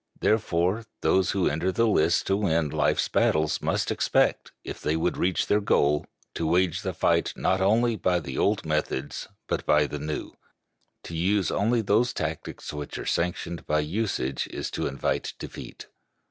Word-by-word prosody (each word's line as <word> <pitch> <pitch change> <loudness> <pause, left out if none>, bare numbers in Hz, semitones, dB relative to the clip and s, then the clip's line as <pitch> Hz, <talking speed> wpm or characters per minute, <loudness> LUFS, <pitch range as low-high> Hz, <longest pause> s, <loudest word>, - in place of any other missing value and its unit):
Therefore, 105 0 +1
those 95 -2 +3
who 95 -3 +1
enter 85 +5 0
the 115 +5 +2
lists 85 -5 +3
to 95 - +1
win 85 -6 +1
life's - - +1
battles 75 -1 +1
must - - 0
expect, - - +1
if - - -7
they 75 - 0
would 80 +2 0
reach 90 0 +1
their 105 - +2
goal, 75 -8 +2 0.3
to 80 - -2
wage 90 +1 +2
the - - -2
fight - - +2
not 95 +1 +1
only 115 +4 +3
by 90 -2 +1
the 65 -5 -7
old 105 -3 +1
methods 75 -3 -2 0.2
but - - -2
by 75 0 +4
the 75 0 -5
new. 75 +1 -4 0.7
To 85 - -7
use 95 +1 +1
only 115 +3 +2
those 110 +4 +2
tactics 80 -1 -5
which 75 -1 -5
are - - -6
sanctioned 85 -1 -2
by 75 0 +2
usage 75 - -2
is - - -5
to - - -2
invite 70 -1 -2
defeat. - - -9
85 Hz, 170 wpm, -26 LUFS, 75-100 Hz, 0.7 s, by